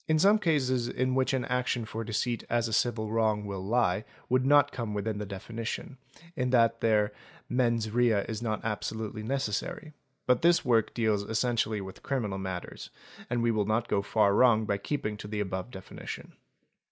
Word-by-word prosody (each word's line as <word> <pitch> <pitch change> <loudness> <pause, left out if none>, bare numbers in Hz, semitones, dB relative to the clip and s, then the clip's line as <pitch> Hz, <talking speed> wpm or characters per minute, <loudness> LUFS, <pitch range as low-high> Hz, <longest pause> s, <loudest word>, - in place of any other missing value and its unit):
Some 200 +6 +5
cases 130 - +1
in 130 +1 0
which 130 0 +2
an 130 -3 0
action 125 -2 -1
for 110 +1 -5
deceit 115 +2 -1
as 120 0 +1
a 110 - -4
civil 110 -1 0
wrong 110 -2 +1
will 100 -2 -5
lie 105 -2 +1 0.3
would 130 +1 +2
not 145 0 +5
come 115 -6 -4
within 105 +1 -2
the 105 - -4
definition, 115 +6 -5 0.4
in 125 0 0
that 115 -2 +3
there 105 -2 +2 0.3
mens 115 -3 +1
rea 115 -3 +3
is 110 -1 -4
not 110 -2 -2
absolutely 110 0 -3
necessary, 135 +5 -3 0.3
but 125 -1 +3
this 170 -1 +4
work 115 -3 +2
deals 110 -3 +2
essentially 110 -2 0
with 95 -1 -9
criminal 110 -8 -2
matters, 95 -2 -6 0.4
and 120 -1 0
we 120 - +3
will 105 -2 +1
not 110 +2 +1
go 100 - +1
far 105 0 +2
wrong 110 -1 +5
by 100 -1 -1
keeping 105 -3 -3
to 105 - -8
the 105 0 -3
above 95 +1 -3
definition. 95 -6 -8
115 Hz, 175 wpm, -29 LUFS, 105-125 Hz, 0.4 s, Some